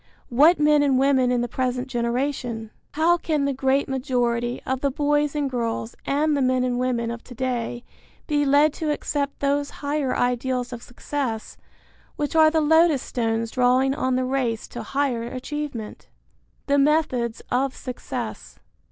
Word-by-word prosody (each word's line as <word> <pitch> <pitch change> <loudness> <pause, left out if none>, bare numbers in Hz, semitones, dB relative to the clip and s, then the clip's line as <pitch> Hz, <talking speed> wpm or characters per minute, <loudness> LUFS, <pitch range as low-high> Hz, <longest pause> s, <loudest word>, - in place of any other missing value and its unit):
What 300 +8 +5
men 300 0 +4
and 275 -2 +3
women 265 -2 +3
in 245 -1 +1
the 240 - -1
present 255 +1 -2
generation? 240 -2 -2 0.2
How 330 +3 +3
can 305 -4 -1
the 280 - 0
great 265 +1 +1
majority 245 -3 -1
of 260 0 -2
the 280 - +2
boys 295 +1 +1
and 290 -1 0
girls 235 -3 -3
and 300 +2 +2
the 280 - 0
men 255 -1 +2
and 245 -1 0
women 240 -2 0
of 235 0 -7
to 245 - -11
day 240 -1 -2 0.4
be 295 -2 +1
led 290 +2 +4
to 315 -1 -3
accept 290 -1 -2
those 285 0 +1 0.2
higher 285 -2 0
ideals 250 0 -1
of 235 - -7
success 245 -2 -4 0.6
which 295 +2 -3
are 315 -1 +7
the 320 0 +1
lodestones 260 -8 +2
drawing 255 +1 +3
on 260 -2 0
the 255 0 0
race 255 -4 -1
to - - -6
higher 270 -4 -1
achievement? 255 -1 -6 0.6
VI. 280 - +1
THE - - +5
METHODS 275 -6 +1
OF 260 +1 +1
SUCCESS. 180 - -6
260 Hz, 160 wpm, -24 LUFS, 245-290 Hz, 0.6 s, are